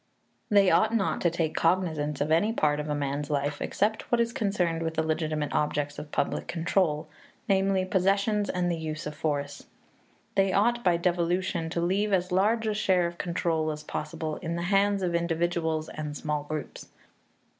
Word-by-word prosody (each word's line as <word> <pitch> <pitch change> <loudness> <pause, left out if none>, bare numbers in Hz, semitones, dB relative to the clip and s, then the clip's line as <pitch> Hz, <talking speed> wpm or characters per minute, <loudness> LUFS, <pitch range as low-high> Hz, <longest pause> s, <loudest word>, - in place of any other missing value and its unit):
They 200 -3 +5
ought 220 +1 +3
not 200 -4 0
to 170 - +3
take 165 -2 -1
cognizance 160 -4 0
of 150 +2 0
any 170 +7 +3
part 150 -8 +1
of 150 0 -4
a 150 - 0
man's 145 0 -2
life 145 0 -1
except 215 +2 -1
what 240 - +3
is 235 0 +1
concerned 195 -8 0
with 160 0 -2
the 160 - +1
legitimate 155 -2 -1
objects 145 -1 -1
of 150 - -9
public - - -1
control, 165 -2 0 0.4
namely, 195 -1 +2
possessions 200 +3 +1
and 180 -1 0
the 165 - -2
use 155 -1 -4
of 150 - -4
force. 145 -2 -2
And - - -22 0.7
they 195 -1 +2
ought, 240 +4 +2
by 175 -2 +3
devolution, 175 -1 0
to 170 +1 -2
leave 195 +4 +1
as 180 -1 +1
large 215 +5 +2
a 215 - +1
share 190 -4 +2
of 170 0 -5
control 165 -2 0
as 150 0 -5
possible 155 +1 -4
in 170 -1 -4
the 170 - -3
hands 200 0 +3
of 175 -1 0
individuals 170 -2 0
and 150 -1 -5
small 150 -1 -2
groups. 155 -1 -6
170 Hz, 185 wpm, -28 LUFS, 155-195 Hz, 0.7 s, They